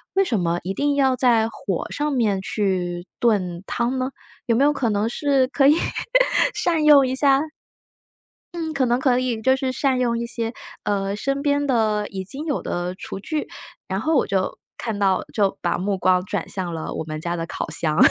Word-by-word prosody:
为 390 - +4
什 235 - 0
么 170 0 0
一 190 +2 -3
定 285 +5 0
要 265 -2 +3
在 235 -3 +3
火 195 -5 -4
上 295 0 -1
面 210 -7 +1
去 180 -3 -2
炖 185 -6 +1
汤 245 +2 -1
呢？ 255 +1 -1 0.4
有 230 - +3
没 270 - +3
有 295 - +4
可 250 -4 0
能 210 +1 +1
是 270 +1 +1
可 275 0 +3
以 295 - +6 0.8
善 330 -3 +1
用 285 -3 +7
一 260 - -1
下 275 0 +4 1.1
嗯， 320 -2 -3
可 270 -2 +1
能 240 +1 +1
可 255 -2 +2
以 240 -3 -1
就 260 +3 +4
是 265 -1 -2
善 260 0 +1
用 235 -2 +1
一 235 - -2
些， 235 0 -3 0.3
呃， 200 -1 -1
身 275 +5 -2
边 285 0 +1
的 215 -4 +1
已 190 -1 -5
经 275 - -4
有 290 - -1
的 175 +1 -3
厨 195 - -7
具。 305 +8 -3 0.4
然 - - -2
后 320 0 +1
我 - - +3
就 190 -2 -1 0.2
看 220 -3 -3
到 195 -2 +2
就 200 -3 +1
把 - - 0
目 195 +1 -1
光 185 -1 +3
转 - - -3
向 180 -3 -3
了 160 - -5
我 - - -3
们 155 0 -6
家 175 +1 -2
的 165 -1 -3
烤 - - -5
箱。 155 0 0
235 Hz, 220 characters per minute, -22 LUFS, 190-270 Hz, 1.1 s, 用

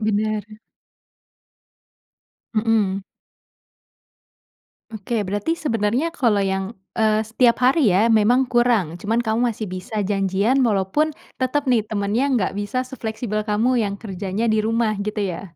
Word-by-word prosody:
Bener. 215 -1 0 2.1
Mhm. 215 -3 +1 1.9
Oke. 220 +1 -3
Berarti 205 - -1
sebenernya 245 +3 0
kalau 225 -10 +1
yang, 190 +2 -2 0.2
eee, 215 0 +3
setiap 235 +2 +3
hari 270 0 +4
ya 220 +5 +3
memang 225 +4 +4
kurang, 225 -9 +2
cuman 225 +3 0
kamu 220 0 0
masih 215 -1 -5
bisa 200 +3 -3
janjian 200 +6 +1
walaupun 240 +7 +1 0.2
tetep 265 +3 0
nih, 220 -3 +2
temennya 210 +4 0
enggak 240 -9 +1
bisa 205 +5 -2
sefleksibel 220 -4 -4
kamu 235 +4 +2
yang 200 -2 -1
kerjanya 200 +1 -4
di 215 - +2
rumah, 225 0 +1
gitu 210 +1 -3
ya? 180 -1 -5
215 Hz, 125 wpm, -21 LUFS, 200-240 Hz, 2.1 s, hari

